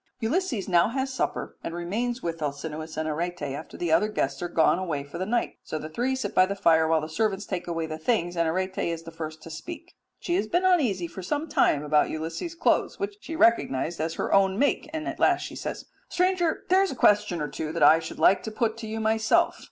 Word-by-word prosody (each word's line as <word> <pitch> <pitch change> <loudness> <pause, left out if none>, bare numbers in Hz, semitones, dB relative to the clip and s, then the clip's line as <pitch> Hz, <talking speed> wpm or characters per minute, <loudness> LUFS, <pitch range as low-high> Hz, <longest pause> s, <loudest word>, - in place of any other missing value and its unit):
Ulysses 255 - -1
now 175 0 +4
has 265 +2 -2
supper - - -3
and 165 - -4
remains 230 +8 -2
with 165 -1 -3
Alcinous 155 +2 -4
and 155 0 -1
Arete 170 +2 -3
after 145 +2 -6
the 175 -2 -2
other 210 +6 +4
guests 140 -10 -2
are 175 - -1
gone 165 +1 +3
away 160 -7 -2
for 145 +4 -9
the 185 - -2
night. 235 +2 -1
So 155 - -5
the 155 0 -6
three 245 +10 -1
sit 260 - -3
by 185 - +5
the 200 - -3
fire 160 -4 +4
while 160 -1 +2
the 155 - -4
servants 195 +4 -1
take 180 -3 -4
away 165 -1 -2
the 155 0 -6
things, 175 -3 0
and 170 -1 +1
Arete 185 +3 -2
is 165 -1 -2
the 165 - -9
first 155 -1 -7
to 165 - -9
speak. 330 - -8 0.3
She 345 - -2
has 395 - -1
been 355 +2 +1
uneasy 255 - +2
for 170 +3 -8
some 290 - -2
time 150 - +2
about 150 0 +3
Ulysses' 165 - -4
clothes, - - +1
which 400 0 -4
she 325 - -6
recognized 170 - +2
as 160 +1 -2
her - - -2
own 195 -1 +4
make, 285 +4 +1
and 315 0 -4
at - - -4
last - - +3
she - - -6
says, - - -5 0.2
"Stranger, 360 -2 +1
there 375 +1 +5
is 390 - +2
a - - -5
question 205 -6 +3
or 150 - -2
two 155 +2 -5
that 165 -2 0
I 155 +2 +7
should 160 - -7
like 195 - +4
to 220 - -6
put 220 0 -1
to 225 -1 -7
you 220 +1 -4
myself. 220 0 +2
180 Hz, 240 wpm, -26 LUFS, 160-240 Hz, 0.3 s, I